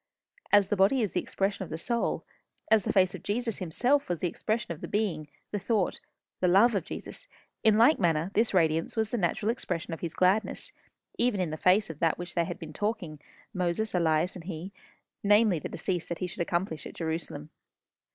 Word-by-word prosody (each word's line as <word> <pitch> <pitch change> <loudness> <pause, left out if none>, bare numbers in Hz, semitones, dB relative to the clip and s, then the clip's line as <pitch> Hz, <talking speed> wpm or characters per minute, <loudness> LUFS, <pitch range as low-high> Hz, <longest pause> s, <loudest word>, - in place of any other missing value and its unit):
As 205 -2 +5
the - - +2
body 205 +6 +3
is 205 - -1
the - - 0
expression 195 +1 -2
of 180 - -9
the 160 - -4
soul, 235 +7 -1 0.5
as 220 -3 +5
the - - +1
face 185 -2 +3
of - - -7
Jesus 230 +1 -2
himself 245 - +1
was 175 - 0
the 180 - 0
expression 215 +4 -2
of 160 - -6
the - - -5
being, 185 -8 -1 0.2
the 205 - -1
thought, 210 -2 0 0.4
the 180 - +2
love 200 +7 +5
of 195 -5 -1
Jesus - - -8 0.4
in 220 -1 +5
like 245 +8 +5
manner 165 -1 +1
this 220 +2 +2
radiance 165 -1 +1
was 220 -1 0
the 245 - 0
natural 205 +4 +1
expression 175 -8 -4
of 165 - -5
his 170 -2 -5
gladness, 190 +4 +1 0.5
even 235 -4 +2
in 175 -4 -1
the - - -2
face 185 +6 +3
of 155 - -13
that 165 -2 +3
of - - -12
which 175 0 -6
they 170 -1 +1
had - - -5
been 155 -1 -9
talking 195 -6 -3 0.3
Moses, 185 +3 -1
Elias, 165 -1 +2
and 175 -3 -9
he 180 +1 -6 0.5
namely, 205 -3 +4
the - - -6
decease 180 -3 -3
that 170 - -3
he 185 - -2
should 180 0 -5
accomplish 170 -1 -2
at - - -11
Jerusalem. 160 -2 -4
185 Hz, 210 wpm, -29 LUFS, 170-215 Hz, 0.5 s, As